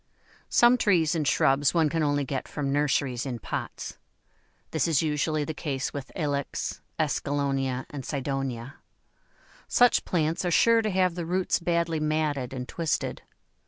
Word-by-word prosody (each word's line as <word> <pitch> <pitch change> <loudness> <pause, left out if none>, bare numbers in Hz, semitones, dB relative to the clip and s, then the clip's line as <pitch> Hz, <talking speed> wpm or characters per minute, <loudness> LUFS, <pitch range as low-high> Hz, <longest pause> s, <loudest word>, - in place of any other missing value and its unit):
Some 240 +1 +5
trees 175 -7 +3
and 155 -4 -1
shrubs 140 +4 +3
one 165 -2 +4
can 160 +2 -1
only 145 -1 +1
get 135 0 -3
from 140 -2 -2
nurseries 140 -4 +1
in 130 -3 -4
pots. - - -5 0.7
This - - +1
is 160 -2 +2
usually 155 0 0
the 160 - -4
case 140 -4 -3
with 140 -2 -6
Ilex, 145 -4 -2 0.2
Escallonia, 140 -4 -1
and 140 -2 -6
Cydonia. 135 -2 -3 0.9
Such 245 -1 +4
plants 160 -1 0
are 175 - 0
sure 230 +7 +5
to 215 - -1
have 185 -2 +2
the 170 -1 -5
roots 185 +1 +1
badly 170 -2 0
matted 150 -4 -1
and 125 -1 -5
twisted. 165 +2 -2
150 Hz, 150 wpm, -27 LUFS, 135-165 Hz, 0.9 s, Some